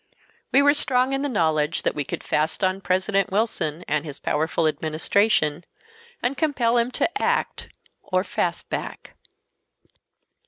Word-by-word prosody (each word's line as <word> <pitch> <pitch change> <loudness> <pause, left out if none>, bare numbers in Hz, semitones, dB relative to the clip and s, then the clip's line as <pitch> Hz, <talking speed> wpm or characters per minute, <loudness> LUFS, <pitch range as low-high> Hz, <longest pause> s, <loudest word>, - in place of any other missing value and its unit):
We 275 - +5
were 285 0 +6
strong 260 -2 +2
in 270 - 0
the 285 - -1
knowledge 160 - +1
that - - +1
we 145 - -2
could - - -6
"fast 155 +6 0
on" 185 +1 +1
President 190 +1 +1
Wilson 180 -6 -1
and 150 0 0
his 145 -3 -7
powerful 160 +2 0
Administration, 155 +2 +1 0.6
and 250 +3 0
compel 255 -7 +1
him 235 +1 +1
to 400 +10 -1
act - - -1 0.3
or 185 -1 0
"fast - - -2
back." - - -6
190 Hz, 145 wpm, -24 LUFS, 155-245 Hz, 0.6 s, were